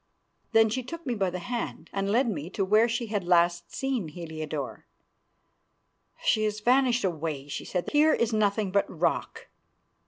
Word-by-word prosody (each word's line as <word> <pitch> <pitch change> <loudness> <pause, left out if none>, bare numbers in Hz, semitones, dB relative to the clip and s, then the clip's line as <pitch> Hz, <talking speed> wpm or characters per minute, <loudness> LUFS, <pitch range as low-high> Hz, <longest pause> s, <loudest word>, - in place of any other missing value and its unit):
Then 225 0 +5
she 255 +4 -1
took 335 +7 -8
me 250 - -1
by 195 -4 0
the 180 - -4
hand 240 +6 -5
and 195 0 -1
led 240 +5 +3
me 165 -7 -3
to 195 0 -1
where 215 +4 +4
she 235 +1 -1
had 210 -3 -2
last 175 -1 +2
seen 265 - -2
Heliodore. 155 -3 -6 1.4
"She 215 - +3
has 210 0 -1
vanished 245 +2 +3
away," 155 -6 -2
she 145 - -5
said, 180 -2 -2
"here 305 +1 +5
is 235 -1 0
nothing 210 -2 +1
but 200 +1 +1
rock." - - -2
205 Hz, 165 wpm, -27 LUFS, 175-235 Hz, 1.4 s, Then